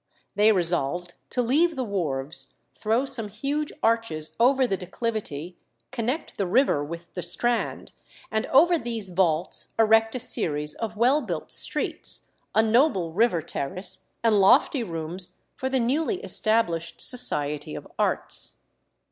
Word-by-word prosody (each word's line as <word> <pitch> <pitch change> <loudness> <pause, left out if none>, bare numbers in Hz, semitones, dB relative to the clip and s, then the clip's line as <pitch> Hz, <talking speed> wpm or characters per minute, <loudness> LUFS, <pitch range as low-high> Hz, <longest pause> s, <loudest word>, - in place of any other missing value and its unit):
They 210 +2 +5
resolved 175 -2 0 0.2
to 250 - 0
leave 310 +8 +2
the 260 - -2
wharves, 155 -8 0 0.2
throw 225 +5 0
some 255 -5 0
huge 280 +8 -3
arches 225 -9 0
over 260 +2 +4
the 195 - 0
declivity, 185 -4 -5 0.3
connect 255 +5 -3
the 195 - 0
river 210 - +2
with 170 +3 -8
the 180 - -4
Strand, 230 +8 -1 0.4
and 220 +1 -1
over 335 +5 +5
these 230 -6 -5
vaults 175 -2 0
erect 225 +1 +4
a - - -2
series 150 -11 0
of 220 -2 -5
well 255 +7 +3
built 175 - -5
streets, - - 0 0.2
a 220 - +5
noble 220 - +2
river 200 -5 +2
terrace, 165 +9 -2
and 215 -3 +4
lofty 255 - +4
rooms 170 -2 -2 0.2
for 260 - -3
the 265 0 +1
newly 305 - 0
established 170 -7 0
Society 150 - 0
of - - -8
Arts. - - -1
220 Hz, 140 wpm, -25 LUFS, 170-245 Hz, 0.4 s, They